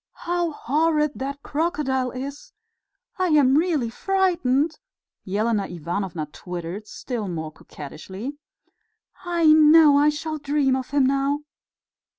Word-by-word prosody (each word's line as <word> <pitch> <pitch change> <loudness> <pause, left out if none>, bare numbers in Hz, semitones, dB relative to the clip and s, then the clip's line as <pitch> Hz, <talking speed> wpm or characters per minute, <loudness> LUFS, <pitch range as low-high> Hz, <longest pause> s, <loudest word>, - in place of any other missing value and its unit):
"How 350 0 0
horrid 300 +2 +1
that 280 +2 -5
crocodile 285 -5 -1
is! 275 +6 -7 0.7
I 370 - +2
am 290 -5 +4
really 305 -8 +1
frightened," 330 -4 +1 0.5
Elena 210 +2 0
Ivanovna 170 0 -4
twittered, 180 +5 -7
still 230 -3 -5
more 160 -3 -4
coquettishly. 190 - -9 0.8
"I 345 -2 0
know 310 -1 +7
I 295 +1 +5
shall 310 +1 -4
dream 285 -2 +1
of 260 -1 -4
him 285 -2 +2
now." 275 +2 +1
280 Hz, 115 wpm, -23 LUFS, 225-310 Hz, 0.8 s, know